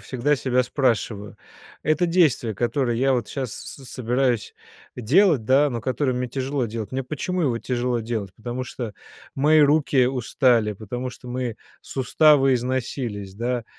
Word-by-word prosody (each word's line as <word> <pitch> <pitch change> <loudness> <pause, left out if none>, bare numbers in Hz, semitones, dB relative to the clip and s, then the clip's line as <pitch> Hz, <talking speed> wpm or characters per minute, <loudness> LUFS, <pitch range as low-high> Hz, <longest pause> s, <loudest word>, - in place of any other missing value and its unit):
всегда 135 +3 0
себя 125 -1 +1
спрашиваю: 115 -5 -1 0.5
"Это 165 +3 +2
действие, 155 - +2
которое 120 +2 0
я 135 +2 +2
вот 120 -4 -1
щас 130 -5 -4
с 135 - -9
собираюсь 125 -2 -1 0.4
э, - - -5
делать, 150 - +4
да, 135 +5 +4
но 120 - -3
которое 130 +2 -1
мне 125 0 -2
тяжело 135 0 -2
делать. 110 0 -6
Мне 135 - -1
почему 175 +6 -3
его 125 -6 +1
тяжело 125 0 -1
делать? 110 -4 -4
Потому 120 +3 -5
что 120 -3 -6 0.4
мои 155 +3 +4
руки 145 -3 +4
устали, 120 -3 +2
потому 120 +5 -5
что 125 0 -12
мои 125 -2 -3 0.3
суставы 135 0 +3
износились, 120 -5 -3
да, 120 +1 -2
125 Hz, 150 wpm, -23 LUFS, 115-135 Hz, 0.5 s, делать